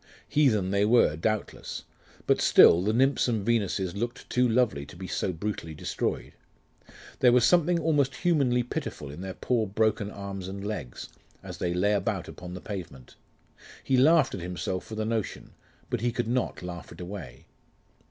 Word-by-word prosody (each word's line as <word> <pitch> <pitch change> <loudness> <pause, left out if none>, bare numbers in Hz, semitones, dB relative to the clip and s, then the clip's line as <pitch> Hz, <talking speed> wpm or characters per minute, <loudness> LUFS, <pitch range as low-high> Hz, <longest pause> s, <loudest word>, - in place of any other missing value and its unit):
Heathen 110 -11 +2
they 100 0 +2
were, 110 -8 +4
doubtless; 110 +6 -3 0.4
but - - +2
still, 85 - +7
the 105 +3 +1
Nymphs 130 +4 +2
and 110 -5 -1
Venuses 100 -5 0
looked 120 +5 -4
too 125 0 +3
lovely 110 - +1
to 70 - -12
be 95 +2 -7
so 95 - -2
brutally 80 -3 -5
destroyed... - - -3 0.9
There 125 - +6
was 120 0 +5
something 175 +1 +3
almost 150 -4 +1
humanly 135 -8 +2
pitiful 75 - -5
in 75 +5 -9
their 95 -1 -6
poor 115 -4 0
broken 105 0 0
arms 100 -2 -6
and 100 +1 -6
legs, 80 - -5 0.3
as - - -8
they 85 0 -1
lay 100 +4 +2
about 100 - -1
upon 90 0 -9
the 90 - -8
pavement.... 85 - -8 0.7
He 135 - +1
laughed 150 +3 +5
at 95 - -5
himself 90 +1 -3
for 110 - -8
the 110 0 -2
notion; 110 -3 -3 0.4
but - - -1
he 120 0 +1
could 120 0 -2
not 125 -5 -1
laugh 90 -1 -7
it - - -12
away. 90 -8 -8
105 Hz, 170 wpm, -27 LUFS, 90-125 Hz, 0.9 s, still